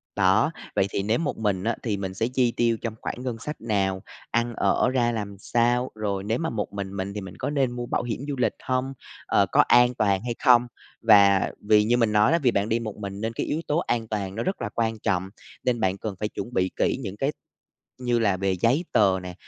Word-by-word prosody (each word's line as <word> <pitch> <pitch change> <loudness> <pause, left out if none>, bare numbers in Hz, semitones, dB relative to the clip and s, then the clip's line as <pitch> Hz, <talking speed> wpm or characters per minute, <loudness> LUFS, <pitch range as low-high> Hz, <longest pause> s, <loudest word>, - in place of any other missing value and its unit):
Đó, 100 +8 +3 0.2
vậy - - +3
thì 95 - -2
nếu 110 +3 +1
một 155 -3 -2
mình 100 -4 -1
á 115 +1 0
thì 110 -4 -1
mình 95 -1 -4
sẽ 110 +5 -1
chi 125 -1 +1
tiêu 115 -1 +2
trong 115 - -3
khoảng - - -4
ngân 125 -3 -3
sách 150 +5 -6
nào, 100 -4 0 0.3
ăn 120 0 0
ở 125 - +2
ra 120 -2 +1
làm 105 -3 -4
sao, 120 +3 +1
rồi 100 -3 -2
nếu 110 +3 0
mà 165 - -1
một 105 -3 -4
mình 100 -1 -5
mình 100 +1 -4
thì 105 - -4
mình 95 -2 -9
có - - -3
nên 135 -4 +1
mua 120 0 -4
bảo - - -1
hiểm 120 -3 -3
du 145 - -2
lịch 125 - +1
hông, 130 +1 -1 0.3
ờ, - - +3
có - - +2
an 120 +1 +5
toàn 100 -5 +1
hay 120 -1 -3
không? 125 -2 +6 0.3
Và 100 -3 +5
vì 105 0 +4
như 120 +3 +2
mình 115 -3 +2
nói 105 +5 +4
á, 170 - +3
vì 130 -6 +3
bạn 100 0 0
đi 115 +1 +1
một 110 -3 -5
mình 100 -1 -6
nên 115 +1 -2
cái - - -2
yếu 155 - -2
tố 150 - +1
an 120 -8 -1
toàn 100 -3 -3
nó 115 - -2
rất 190 - -2
là 105 - -2
quan 115 -1 -1
trọng, 95 -2 -1 0.3
nên 125 -2 +1
bạn 95 -2 0
cần 105 -1 -5
phải 105 - -2
chuẩn 120 - -6
bị 95 -3 +1
kỹ - - +1
những 100 -1 -6
cái 135 +6 0 0.7
như 120 -1 +1
là 100 -4 +2
về 95 0 0
giấy 125 - +1
tờ 95 -3 +3
nè, 90 0 -6
110 Hz, 250 wpm, -25 LUFS, 100-120 Hz, 0.7 s, không